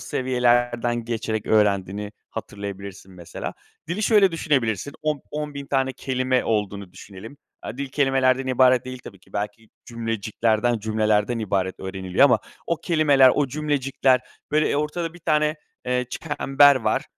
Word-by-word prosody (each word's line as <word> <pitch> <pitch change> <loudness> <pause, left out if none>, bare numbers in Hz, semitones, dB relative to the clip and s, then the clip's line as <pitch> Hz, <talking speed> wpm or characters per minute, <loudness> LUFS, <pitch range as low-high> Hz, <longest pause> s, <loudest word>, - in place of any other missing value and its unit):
seviyelerden 120 -2 +1
geçerek 110 -2 -3
öğrendiğini 105 -1 +1 0.2
hatırlayabilirsin 100 -1 -8
mesela. 85 -2 -7 0.3
Dili 185 +6 -2
şöyle 205 -4 +4
düşünebilirsin, 140 - 0
on 150 -2 -1
on 150 -1 -4
bin 140 -1 -6
tane 135 -1 0
kelime 130 -1 -1
olduğunu 100 -4 -2
düşünelim. 100 +7 -11 0.3
Aaa, 115 - -7
dil 140 - -3
kelimelerden 135 -1 +2
ibaret 130 -1 +4
değil 130 0 -7
tabii 100 -4 -11
ki, 95 - -25
belki 105 +2 -5 0.2
cümleciklerden, 115 0 -1
cümlelerden 110 +1 +1
ibaret 95 -3 -2
öğreniliyor 95 +4 +1
ama 125 -5 +5 0.3
o 170 - 0
kelimeler, 150 -6 +4
o 145 -2 +1
cümlecikler, 135 -3 +1 0.3
böyle, 155 +1 +2
eee, - - 0
ortada 160 +3 -2
bir 175 - -12
tane, 155 -1 +1 0.3
eee, 125 0 0
çember 145 -2 +3
var. 110 -4 0
125 Hz, 140 wpm, -23 LUFS, 105-140 Hz, 0.3 s, ama